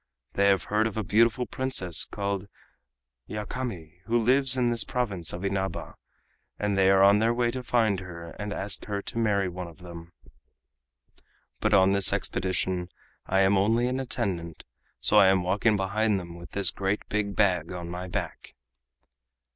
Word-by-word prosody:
They 100 Hz, 0 st, +2 dB
have 100 Hz, -1 st, +3 dB
heard 110 Hz, +2 st, +1 dB
of 110 Hz, -, -6 dB
a 110 Hz, -, -1 dB
beautiful 115 Hz, +5 st, +2 dB
Princess 95 Hz, -13 st, +1 dB
called 100 Hz, -1 st, -4 dB, 0.8 s
Yakami 105 Hz, -6 st, -6 dB
who 120 Hz, +1 st, +2 dB
lives 130 Hz, +3 st, +3 dB
in 120 Hz, -2 st, +2 dB
this 115 Hz, -, 0 dB
province 100 Hz, -, -2 dB
of 90 Hz, +3 st, -6 dB
Inaba, 95 Hz, -1 st, -3 dB, 0.6 s
and 105 Hz, -1 st, -1 dB
they 95 Hz, -1 st, +4 dB
are 95 Hz, 0 st, +5 dB
on 100 Hz, +1 st, +6 dB
their 115 Hz, +2 st, +2 dB
way 120 Hz, -1 st, +1 dB
to 130 Hz, +1 st, -5 dB
find 115 Hz, -5 st, +1 dB
her 85 Hz, -3 st, -9 dB
and 105 Hz, 0 st, -4 dB
to 105 Hz, -, -4 dB
ask 100 Hz, +1 st, -1 dB
her 100 Hz, -1 st, -4 dB
to 115 Hz, -, -4 dB
marry 100 Hz, -4 st, +1 dB
one 90 Hz, 0 st, -6 dB
of 85 Hz, -, -13 dB
them. 85 Hz, -2 st, -11 dB, 1.5 s
But -, -, +2 dB
on 95 Hz, 0 st, +5 dB
this 100 Hz, -1 st, +4 dB
expedition 90 Hz, -1 st, -2 dB, 0.4 s
I 95 Hz, +1 st, +2 dB
am 95 Hz, 0 st, +4 dB
only 115 Hz, +5 st, +2 dB
an 130 Hz, +1 st, -1 dB
attendant, 90 Hz, -10 st, -3 dB, 0.4 s
so -, -, +2 dB
I 95 Hz, -, +7 dB
am 95 Hz, -1 st, +3 dB
walking 100 Hz, +4 st, +2 dB
behind 100 Hz, +1 st, 0 dB
them 85 Hz, -2 st, -9 dB
with 85 Hz, 0 st, -12 dB
this 100 Hz, -3 st, +1 dB
great 95 Hz, +2 st, -2 dB
big 100 Hz, -1 st, -2 dB
bag 90 Hz, -6 st, +1 dB
on 90 Hz, -1 st, -6 dB
my 90 Hz, +1 st, -6 dB
back." 90 Hz, -, -5 dB
100 Hz, 175 wpm, -27 LUFS, 90-110 Hz, 1.5 s, I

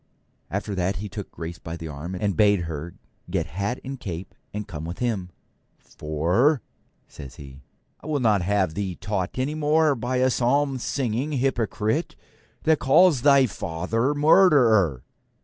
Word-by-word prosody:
After 100 Hz, +1 st, -3 dB
that 95 Hz, +1 st, -1 dB
he 105 Hz, -, -5 dB
took 105 Hz, -1 st, -7 dB
Grace 85 Hz, 0 st, -7 dB
by 80 Hz, +1 st, -7 dB
the 80 Hz, -, -7 dB
arm, 80 Hz, +5 st, -6 dB
and 100 Hz, +1 st, -1 dB
bade 105 Hz, -3 st, +4 dB
her 80 Hz, 0 st, -6 dB, 0.3 s
get -, -, -1 dB
hat 100 Hz, -, -3 dB
and 135 Hz, 0 st, -6 dB
cape 90 Hz, -2 st, -6 dB, 0.2 s
and 105 Hz, 0 st, -5 dB
come 80 Hz, -6 st, -7 dB
with 85 Hz, +2 st, -6 dB
him. 110 Hz, -7 st, -2 dB, 0.5 s
'For,' 90 Hz, -, 0 dB, 0.4 s
says 70 Hz, -2 st, -11 dB
he, 70 Hz, -1 st, -12 dB, 0.4 s
'I -, -, -12 dB
will 150 Hz, -2 st, 0 dB
not 110 Hz, -6 st, +3 dB
have 95 Hz, -2 st, +1 dB
thee 95 Hz, 0 st, -3 dB
taught 95 Hz, +1 st, -3 dB
any 130 Hz, +3 st, -1 dB
more 155 Hz, 0 st, +3 dB
by 125 Hz, 0 st, -3 dB
a 130 Hz, +1 st, +3 dB
psalm 135 Hz, +2 st, +1 dB
singing 130 Hz, +3 st, -2 dB
hypocrite 125 Hz, +1 st, -1 dB, 0.5 s
that 160 Hz, -1 st, +3 dB
calls 150 Hz, +1 st, +5 dB
thy 140 Hz, -1 st, +6 dB
father 115 Hz, -, -2 dB
murderer.' 125 Hz, -, +4 dB
105 Hz, 155 wpm, -24 LUFS, 90-135 Hz, 0.5 s, thy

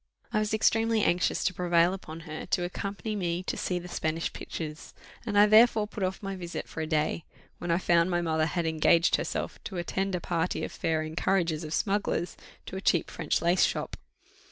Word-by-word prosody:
I 215 Hz, -, +3 dB
was 215 Hz, 0 st, -1 dB
extremely 225 Hz, 0 st, +2 dB
anxious 175 Hz, 0 st, +1 dB
to -, -, +1 dB
prevail 175 Hz, 0 st, +3 dB
upon 165 Hz, -4 st, -8 dB
her 155 Hz, -1 st, -7 dB
to 180 Hz, -, +1 dB
accompany 200 Hz, +4 st, -4 dB
me 175 Hz, -2 st, -1 dB
to -, -, -3 dB
see 180 Hz, -, -1 dB
the 180 Hz, 0 st, -6 dB
Spanish 160 Hz, -1 st, -2 dB
pictures, 155 Hz, -1 st, -7 dB, 0.3 s
and 205 Hz, -2 st, 0 dB
I 205 Hz, -, +8 dB
therefore 215 Hz, 0 st, +6 dB
put 210 Hz, 0 st, -8 dB
off 190 Hz, +2 st, -2 dB
my 195 Hz, 0 st, -3 dB
visit 175 Hz, -2 st, -6 dB
for 160 Hz, -, -6 dB
a 155 Hz, -, -2 dB
day, 155 Hz, +1 st, 0 dB, 0.4 s
when 175 Hz, -, -5 dB
I 170 Hz, -, +3 dB
found 170 Hz, -1 st, +3 dB
my 175 Hz, -1 st, +1 dB
mother 160 Hz, -2 st, +1 dB
had 170 Hz, +1 st, -1 dB
engaged 160 Hz, +1 st, +3 dB
herself -, -, -4 dB
to 190 Hz, -, -5 dB
attend 190 Hz, +2 st, -1 dB
a -, -, -1 dB
party 170 Hz, +1 st, -1 dB
of -, -, -4 dB
fair 160 Hz, -1 st, -1 dB
encouragers 165 Hz, 0 st, 0 dB
of 155 Hz, -, -6 dB
smugglers 195 Hz, -1 st, 0 dB, 0.3 s
to -, -, -7 dB
a 190 Hz, -, -4 dB
cheap 170 Hz, -4 st, +2 dB
French 165 Hz, 0 st, -1 dB
lace 175 Hz, +2 st, +4 dB
shop. -, -, -1 dB
175 Hz, 205 wpm, -28 LUFS, 165-195 Hz, 0.4 s, I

